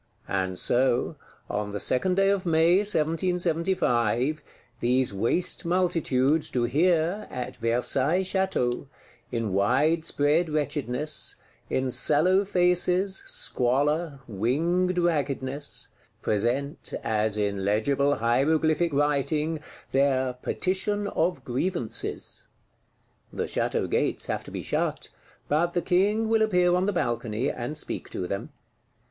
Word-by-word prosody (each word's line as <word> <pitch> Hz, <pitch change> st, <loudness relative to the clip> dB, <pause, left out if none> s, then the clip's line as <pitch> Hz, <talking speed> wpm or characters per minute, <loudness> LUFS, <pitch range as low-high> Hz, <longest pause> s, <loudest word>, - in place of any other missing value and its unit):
And 95 Hz, -1 st, -1 dB
so, 125 Hz, -, +1 dB, 0.3 s
on 105 Hz, 0 st, -2 dB
the 105 Hz, 0 st, -4 dB
second 180 Hz, -, +1 dB
day 195 Hz, 0 st, +3 dB
of 200 Hz, -2 st, 0 dB
May 165 Hz, 0 st, +4 dB
1775, 165 Hz, -, +1 dB, 0.4 s
these 125 Hz, -1 st, +1 dB
waste 115 Hz, -, 0 dB
multitudes 165 Hz, -5 st, +1 dB
do 125 Hz, -, 0 dB
here, 170 Hz, -, +1 dB
at 125 Hz, -1 st, -5 dB
Versailles 130 Hz, +8 st, +1 dB
Château, 190 Hz, -10 st, -1 dB, 0.4 s
in 115 Hz, -5 st, -2 dB
wide 135 Hz, -, +2 dB
spread 155 Hz, +2 st, +2 dB
wretchedness, 150 Hz, -1 st, -1 dB, 0.3 s
in 130 Hz, -1 st, 0 dB
sallow 180 Hz, +9 st, +3 dB
faces, 180 Hz, +1 st, +1 dB
squalor, 140 Hz, +4 st, 0 dB
winged 165 Hz, -, 0 dB
raggedness, 145 Hz, -4 st, -2 dB, 0.3 s
present, 125 Hz, -, -1 dB
as 110 Hz, -1 st, 0 dB
in 100 Hz, -2 st, -1 dB
legible 140 Hz, +8 st, +2 dB
hieroglyphic 155 Hz, +8 st, +2 dB
writing, 150 Hz, +2 st, +1 dB, 0.3 s
their 130 Hz, -2 st, +2 dB
Petition 195 Hz, +9 st, -1 dB
of 160 Hz, -5 st, -1 dB
Grievances. 130 Hz, -1 st, -3 dB, 0.8 s
The -, -, -2 dB
Château -, -, -1 dB
gates -, -, 0 dB
have -, -, -3 dB
to -, -, -8 dB
be -, -, -5 dB
shut; -, -, -2 dB, 0.4 s
but 170 Hz, +4 st, +1 dB
the 175 Hz, -, +2 dB
King 205 Hz, +5 st, +2 dB
will 225 Hz, 0 st, +2 dB
appear 180 Hz, -5 st, +3 dB
on 180 Hz, +2 st, +2 dB
the -, -, +2 dB
balcony, 120 Hz, -, -1 dB
and 130 Hz, +5 st, -5 dB
speak -, -, -4 dB
to 90 Hz, -, -4 dB
them. 100 Hz, +2 st, -4 dB
150 Hz, 115 wpm, -26 LUFS, 125-180 Hz, 0.8 s, May